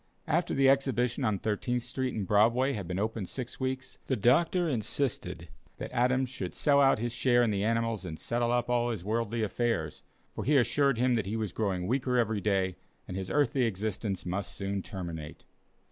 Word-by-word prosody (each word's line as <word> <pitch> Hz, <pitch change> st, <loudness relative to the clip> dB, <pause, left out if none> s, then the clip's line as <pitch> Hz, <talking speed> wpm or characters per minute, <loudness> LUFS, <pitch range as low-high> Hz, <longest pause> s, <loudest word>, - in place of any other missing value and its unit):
After -, -, 0 dB
the 135 Hz, 0 st, +4 dB
exhibition 135 Hz, -2 st, +2 dB
on 110 Hz, -5 st, +1 dB
Thirteenth 115 Hz, +5 st, -1 dB
Street 130 Hz, +1 st, -3 dB
and 105 Hz, -3 st, -2 dB
Broadway 115 Hz, +7 st, +3 dB
had 100 Hz, -7 st, -4 dB
been 90 Hz, +1 st, -3 dB
open 110 Hz, -1 st, -2 dB
six 125 Hz, +3 st, -6 dB
weeks, 130 Hz, 0 st, -3 dB
the 130 Hz, -, +1 dB
doctor 165 Hz, -, +3 dB
insisted 130 Hz, 0 st, -2 dB, 0.3 s
that -, -, -6 dB
Adams 130 Hz, +2 st, +2 dB
should 95 Hz, -8 st, -6 dB
sell 140 Hz, -1 st, +4 dB
out 135 Hz, -1 st, +5 dB
his 120 Hz, +1 st, -3 dB
share 120 Hz, -1 st, +3 dB
in 115 Hz, -, +2 dB
the 100 Hz, -1 st, 0 dB
animals 115 Hz, -2 st, 0 dB
and 80 Hz, -4 st, -6 dB
settle 120 Hz, 0 st, 0 dB
up 120 Hz, 0 st, +1 dB
all 120 Hz, 0 st, +1 dB
his 110 Hz, -7 st, -4 dB
worldly 115 Hz, +2 st, -1 dB
affairs, 115 Hz, +2 st, -1 dB, 0.3 s
for -, -, -4 dB
he 145 Hz, +1 st, +3 dB
assured 140 Hz, +1 st, +3 dB
him 125 Hz, +1 st, +2 dB
that 110 Hz, -5 st, 0 dB
he 105 Hz, -, -2 dB
was 105 Hz, -5 st, -3 dB
growing 95 Hz, -4 st, -1 dB
weaker 125 Hz, +3 st, 0 dB
every 110 Hz, -3 st, +1 dB
day, 95 Hz, -3 st, 0 dB, 0.3 s
and 90 Hz, -, -6 dB
his 95 Hz, -1 st, -4 dB
earthly 145 Hz, -3 st, +2 dB
existence 105 Hz, -2 st, -3 dB
must 95 Hz, +3 st, -3 dB
soon 100 Hz, 0 st, -2 dB
terminate. 85 Hz, -6 st, -7 dB
115 Hz, 190 wpm, -30 LUFS, 100-130 Hz, 0.3 s, out